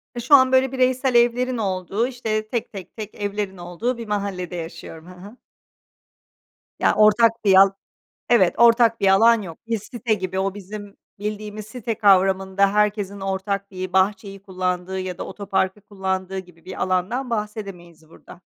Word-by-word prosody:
Ya, 240 - -4
şu 270 +4 +6
an 260 -1 +5
böyle 260 0 +3
bireysel 255 0 +1
evlerin 245 +1 +2
olduğu, 195 +3 -1
işte, 220 -4 -3
tek, 235 0 -3
tek, 190 -3 -10
tek 215 -1 -7
evlerin 205 -2 -4
olduğu 180 +8 -3
bir 230 -2 -7
mahallede 195 -4 -3
yaşıyorum. 165 -1 -8
Hı - - -11
hı. 200 +7 -13 1.4
Ya - - +3
ortak 215 +2 +5
bir 195 - +5
al 195 +1 +7 0.6
Evet 195 -7 +4
ortak 230 -1 +5
bir 195 - +3
alan 225 +3 +5
yok. 165 -4 -9
Bir 230 -1 -1
site 225 +2 -2
gibi, 190 -2 -4
o 195 0 -1
bizim 205 0 -9 0.2
bildiğimiz 210 0 -5
site 230 0 -4
kavramında 195 -1 +3
herkesin 205 -1 0
ortak 195 +1 -3
bir 185 -1 -6
bahçeyi 195 +1 0
kullandığı 185 0 -3
ya 185 -1 -5
da - - -4
otoparkı 195 0 -2
kullandığı 190 -1 -4
gibi 180 -3 -12
bir 185 - -6
alandan 185 +8 -1
bahsedemeyiz 195 -7 -6
burada. 170 - -15
200 Hz, 160 wpm, -22 LUFS, 190-225 Hz, 1.4 s, al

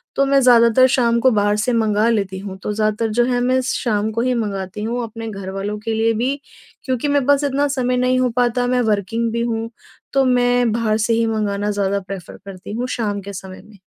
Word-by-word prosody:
तो 275 - +3
मैं 275 0 +3
ज़्यादातर 245 0 +5
शाम 235 -2 +2
को 260 +2 +4
बाहर 205 -1 +2
से 230 +4 0
मँगा 220 -1 +2
लेती 195 -4 -1
हूँ 190 -1 -7
तो 210 - -2
ज़्यादातर 215 +1 0
जो 240 - +5
है 245 0 0
मैं 255 +1 +2
शाम 220 -5 -1
को 230 +1 -2
ही 250 +1 +1
मँगाती 195 0 -5
हूँ 235 +3 -2
अपने 225 0 -7
घरवालों 195 +1 -5
के 225 - -1
लिए 225 +1 +1
भी, 250 +5 -1 0.5
क्योंकि 260 +1 -1
मेरे 285 -2 +1
पास 285 +1 +3
इतना 285 +1 +1
समय 250 0 0
नहीं 255 0 +2
हो 255 -1 +2
पाता 245 0 +1
मैं 250 0 +1
वर्किंग 225 +3 -1
भी 235 +1 -2
हूँ, 230 -1 -2 0.4
तो 270 -1 +3
मैं 245 -1 +2
बाहर 220 -1 0
से 220 +1 +1
ही 230 0 +2
मँगाना 210 -2 -1
ज़्यादा 200 -1 0
प्रेफर 195 -3 -8
करती 195 +1 -9
हूँ 245 +3 -2
शाम 205 -3 -2
के 200 +1 -8
समय 190 0 -9
में। 215 -1 -17
225 Hz, 220 wpm, -19 LUFS, 205-245 Hz, 0.5 s, ज़्यादातर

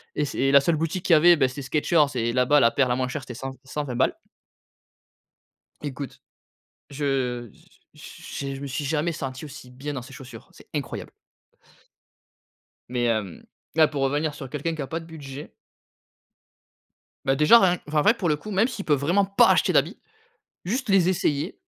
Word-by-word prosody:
et 150 - 0
c'est 135 -1 0
la 140 0 +7
seule 160 +2 +1
boutique 165 +3 -3
qu'il 175 - +4
y - - +8
avait, 175 +3 +7
bah, 135 -4 +2
c'était 130 +2 -7
Skechers 150 +3 +2
et 115 -1 0
là-bas, 130 +3 +4
la 115 -2 +4
paire 135 -2 +2
la 125 - +2
moins 130 0 -1
chère 145 +1 -4
c'était 120 - -9
100-120 135 +1 -6
balles. - - +1 1.6
Écoute, 140 -1 -7 0.7
je 130 -5 -2
j - - -23 0.3
j - - -13 0.2
j'ai 140 -1 -4
je - - -9
me 140 - -5
suis 140 +2 -4
jamais 155 +3 0
senti 130 -1 -6
aussi 135 -3 -11
bien 140 +3 -6
dans 130 - -5
ces 130 +3 -13
chaussures, 130 -1 -11
c'est - - -18
incroyable! - - -5 1.8
Mais 120 -1 -1
hem, 110 -6 -2 0.3
là 160 -1 +6
pour 145 -2 -4
revenir 145 +3 0
sur 135 -3 -8
quelqu'un 155 +3 -3
qui 155 - -5
a 135 - -4
pas 165 - -3
de 165 - -12
budget 145 -3 -9 1.7
bah, 135 - +2
déjà 150 +11 +7
rien 180 -2 +3
enfin, 150 0 +1
en - - +3
vrai 210 - +5
pour 190 -8 -2
le 150 - +3
coup, 210 +8 -9
même 205 +4 +3
s'il 225 -6 -6
peut 150 - +3
vraiment 170 +8 +2
pas 195 +1 +4
acheter - - +3
d'habits, - - +2 0.7
juste 245 +8 -2
les 190 -3 +4
essayer, 160 -2 -1
145 Hz, 190 wpm, -24 LUFS, 130-165 Hz, 1.8 s, y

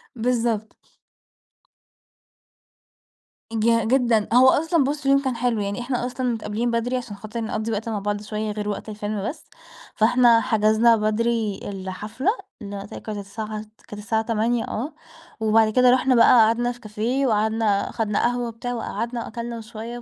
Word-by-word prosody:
بالضبط. 230 -2 -1 2.8
ج 230 0 +2
جدًا. 235 -4 +2
هو 255 +1 +7
أصلًا 325 0 +2
بُص، 285 +1 -3
اليوم 275 0 +4
كان 260 -3 -2
حلو. 230 -2 0
يعني 200 +4 -3
إحنا 245 0 -2
أصلًا 255 0 -3
متقابلين 225 +2 -2
بدري 240 +2 0
عشان 235 -5 -6
خاطر 215 +3 -6
نقضّي 220 0 -3
وقت 220 +2 -3
مع 215 -2 -2
بعض 205 +1 -2
شوية 215 0 -3
غير 210 0 -4
وقت 205 - -5
الفيلم 210 0 -3
بس، 310 +2 -9 0.5
فإحنا 235 0 +5
حجزنا 220 +2 +4
بدري 215 -1 0
الحفلة 200 - -3 0.3
اللي 200 -1 -6
قُلت 200 - -10
لك - - -7
كانت 215 -2 -5
الساعة 210 +2 -6
ت 215 +1 -18
كانت 210 0 -8
الساعة 220 +1 0
20:00 230 +1 0
آه. 265 +9 -4 0.5
وبعد 220 0 +4
كده 250 -1 +5
رُحنا 255 0 +3
بقى 230 - +6 0.2
قعدنا 240 +2 +1
في 245 - -11
كافيه 235 +6 -1
وقعدنا 215 -2 +1
أخدنا 210 -2 -1
قهوة 245 0 0
وبتاع 235 +2 -5
وقعدنا 235 0 -3
وأكلنا 235 0 -6
وشوية 225 +2 -7
و - - -9
225 Hz, 160 wpm, -23 LUFS, 215-245 Hz, 2.8 s, هو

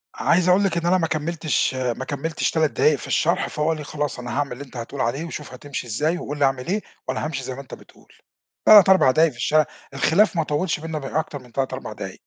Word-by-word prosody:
عايز 180 +1 +2
أقول 185 +3 +5
لِك 185 -4 0
إن 170 - -2
أنا 180 +2 +4
ما 165 -3 0
كمّلتش 155 -3 -1
ما 130 0 -2
كمّلتش 150 +4 -2
3 160 -2 +1
دقايق 150 - +3
في - - -9
الشرح، 170 +3 +1
فهو 150 +1 -2
قال 160 - +1
لي: 150 - -6
"خلاص 145 -2 -4
أنا 120 -1 -6
هاعمل 145 -3 -1
اللي 125 +3 -6
أنت 130 -2 -12
هتقول 125 +3 -5
عليه، 135 +7 -1
وشوف 150 -5 -7
هتمشي 130 -1 -6
إزاي، 155 +10 0
وقل 145 -2 -5
لي 140 - +4
أعمل 135 0 -1
إيه، 205 +3 0 0.3
وأنا - - -2
هامشي 140 -4 -4
زي 130 - -5
ما 135 - -7
أنت 140 - -14
بتقول"، - - -15 0.5
3 205 -3 +9
4 190 -9 +6
دقايق 160 +3 +3
في 120 - -17
الشارع، 155 +4 +3 0.3
الخلاف 165 +10 +3
ما 165 - +2
طوّلش 150 +2 -1
بيننا 160 -1 -4
بأكتر 145 +1 -3
من 125 -2 -17
3 135 +1 -2
4 - - -6
دقايق. - - -8
150 Hz, 245 wpm, -23 LUFS, 135-165 Hz, 0.5 s, 3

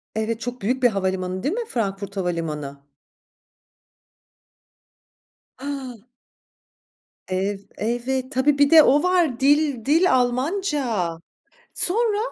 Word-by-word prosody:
Evet, 220 +1 -2
çok 245 +1 -5
büyük 250 +6 -1
bir 245 - +6
havalimanı, 185 -2 -2
değil 295 - 0
mi 470 +2 -3
Frankfurt 200 - -3
havalimanı? 155 -6 -4 2.8
A! 265 -5 -6 1.3
Ev 195 +2 -1 0.2
evet. 250 +4 -2
Tabii, 280 +1 +2
bir 285 -1 +4
de 320 -1 +8
o 290 +2 +4
var 350 -9 +2
dil 285 -4 +2
dil 330 +6 +3
Almanca. 255 - 0 0.7
Sonra? 425 +3 +1
250 Hz, 100 wpm, -23 LUFS, 195-290 Hz, 2.8 s, de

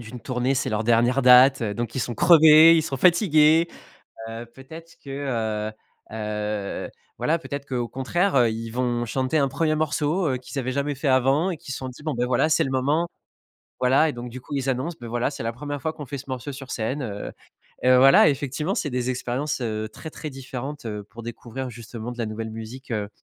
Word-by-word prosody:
d'une 120 +1 -9
tournée. 125 +2 -1
C'est 130 - -1
leur 110 +1 -1
dernière 120 +3 +3
date, 125 +1 +7
heu, 105 -2 -1
donc 115 +2 -4
ils 130 - -1
sont 120 0 -3
crevés, 160 - +8
ils 160 - +2
sont 135 -3 -4
fatigués. 165 - +5 0.6
Heu, 115 +1 -7
peut-être 150 +8 -13
que, 140 - -11
heu 115 -6 -2 0.4
heu, 105 -2 -3 0.3
voilà, 165 +2 +1
peut-être 140 -3 -6
qu'au 120 -2 -2
contraire, 175 +10 -1
heu, 120 -4 +4
ils 115 +1 -5
vont 120 0 -1
chanter 130 +6 0
un 140 - +2
1er 155 +4 0
morceau, 155 +3 0
heu, 130 - 0
qu'ils 130 +2 -6
avaient 130 0 -2
jamais 140 +2 -1
fait 140 +2 -4
avant 135 +6 +3
et 175 - -3
qu'ils 140 - -9
se - - -5
sont 130 - -5
dit: 125 +4 -13
«Bon, 155 -1 -2
beh, 120 0 0
voilà, 125 +4 +2
c'est 155 - +3
le - - -3
moment», 140 +6 +1 0.7
voilà 135 +5 +4
et - - -6
donc 120 -1 -7
du 125 +1 -9
coup, 145 - -7
ils 135 -1 -2
annoncent: 135 +6 -2
«Beh, 120 - -7
voilà, 120 +3 -1
c'est - - -7
la 115 +1 -2
1re 145 +2 -5
fois 160 +1 -3
qu'on 150 - -8
fait 140 +1 -6
ce 130 - -9
morceau 130 +2 -5
sur 135 -1 -9
scène, 120 +6 -2
heu» 105 -4 -5 0.5
et - - +2
heu, 130 - +7
voilà, 135 +4 +7
effectivement, 145 +5 -2
c'est 150 - -2
des 125 0 -2
expériences, 130 +3 -2
heu, 110 -2 -3
très 155 +7 -8
différentes, 135 +1 -7
heu, 105 -2 -5
pour 115 +3 -12
découvrir 120 +2 -6
justement 115 0 -8
de 120 - -12
la 115 - -1
nouvelle 110 +1 -5
musique, 115 +4 -9
heu, 105 -3 -2
130 Hz, 220 wpm, -24 LUFS, 120-145 Hz, 0.7 s, crevés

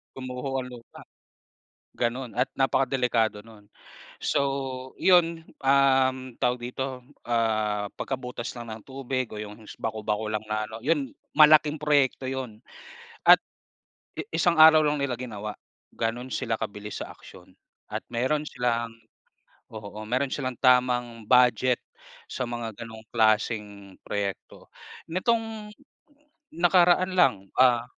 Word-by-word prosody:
Gumuho 130 +1 -4
ang 125 - -7
lupa, 120 -1 -13 0.9
gano'n 120 0 -2
at 125 +2 +1
napakadelikado 125 -5 +1
nun. 105 -2 -17 0.5
So, 135 -2 -2
yun 170 -3 +3 0.2
,um, 130 -2 +3
tawag 125 0 +1
dito, 125 +1 -5 0.2
ah, 110 -3 0
pagkabutas 125 -2 -5
lang 120 -2 -7
ng 110 0 -9
tubig 130 -2 -3
o - - -8
yung 105 +1 -10
bako-bako 110 -1 -2
lang 110 0 -2
na 110 0 -1
ano, 110 +1 -9
yun 145 +1 0 0.2
malaking 155 0 +7
proyekto 145 -3 +2
yun 130 -4 -5 0.6
at - - +9 0.8
i - - -2
isang 170 -3 +2
araw 155 0 +9
lang 150 0 +1
nila 140 -2 -1
ginawa, 105 -4 -6 0.4
gano'n 115 +3 -2
sila 115 -1 -1
kabilis 105 +1 -6
sa - - -7
aksiyon, - - -16 0.3
at - - -5
meron 130 +6 0
silang 120 -4 -1 0.8
oo, 105 0 -8
meron 130 +4 -1
silang 130 -3 -3
tamang 125 -3 +2
budget 125 +1 +4 0.5
sa 130 - -3
mga 120 -1 -4
gano'ng 115 -2 -9
klaseng 105 -3 0
proyekto. 100 -1 -5 0.4
Nitong 220 +2 -1 0.8
nakaraan 175 +1 +4
lang, 135 -9 +5 0.2
ah 125 -2 +5
125 Hz, 120 wpm, -26 LUFS, 110-135 Hz, 0.9 s, at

